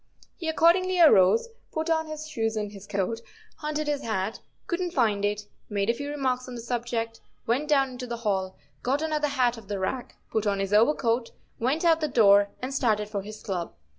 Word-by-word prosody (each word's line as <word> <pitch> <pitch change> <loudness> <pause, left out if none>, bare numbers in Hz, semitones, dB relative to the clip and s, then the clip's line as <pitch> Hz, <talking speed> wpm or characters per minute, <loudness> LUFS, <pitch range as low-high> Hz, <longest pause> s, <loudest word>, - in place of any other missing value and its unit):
He 330 -3 -4
accordingly 355 +3 +3
arose, 215 - +6 0.2
put 315 +1 -2
on 320 -1 +1
his 310 0 -6
shoes 225 -7 -1
and 210 -1 -2
his 200 -1 -11
coat, 205 +4 -2 0.4
hunted 305 0 -2
his 290 -1 0
hat, 215 -1 -2 0.3
couldn't 350 0 -2
find 215 -6 +2
it, 205 0 0 0.3
made 205 +1 +1
a - - -3
few 285 +4 -5
remarks 260 -3 -1
on 250 - -7
the 235 - -6
subject, 230 -1 -3 0.2
went 260 +6 0
down 275 -3 +3
into 250 0 -7
the 235 0 -4
hall, 190 -2 -1 0.2
got 275 +5 0
another 305 -1 0
hat 250 -4 +1
off 210 - -16
the 205 0 -3
rack, 240 +7 -3 0.2
put 220 -1 0
on 200 -1 +1
his 195 +1 -2
overcoat, 230 +1 +3 0.3
went 275 +9 0
out 325 -1 +4
the 305 - +1
door 205 -6 +5
and 260 +2 -3
started 215 -6 +1
for 205 -2 -3
his 210 +2 -10
club. 180 -4 -4
240 Hz, 200 wpm, -27 LUFS, 210-295 Hz, 0.4 s, arose